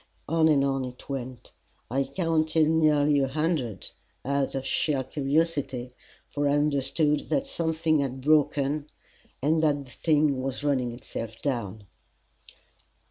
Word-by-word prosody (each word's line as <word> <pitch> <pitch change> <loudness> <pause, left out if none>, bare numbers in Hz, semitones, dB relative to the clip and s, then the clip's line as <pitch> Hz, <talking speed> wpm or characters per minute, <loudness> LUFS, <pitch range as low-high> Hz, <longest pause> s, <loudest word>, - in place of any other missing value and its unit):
On 160 0 +3
and 140 -3 +4
on 135 -1 0
it 125 -1 -9
went. 130 -3 -6 0.4
I 135 +2 +1
counted 160 +1 +1
nearly 150 -2 +3
a 135 - +2
hundred, 140 - -2 0.3
out 140 0 0
of 135 0 -3
sheer 135 0 0
curiosity, 135 -2 -1 0.4
for 145 0 -1
I - - +2
understood 145 +1 +1
that 275 0 +1
something 160 - 0
had 135 -2 -2
broken 145 0 +2 0.6
and 155 +2 +3
that 145 -3 +1
the 125 - -15
thing 150 -3 +1
was 135 +2 -4
running 130 -4 +1
itself 115 -2 -7
down. 110 -7 -3
145 Hz, 135 wpm, -27 LUFS, 130-155 Hz, 0.6 s, and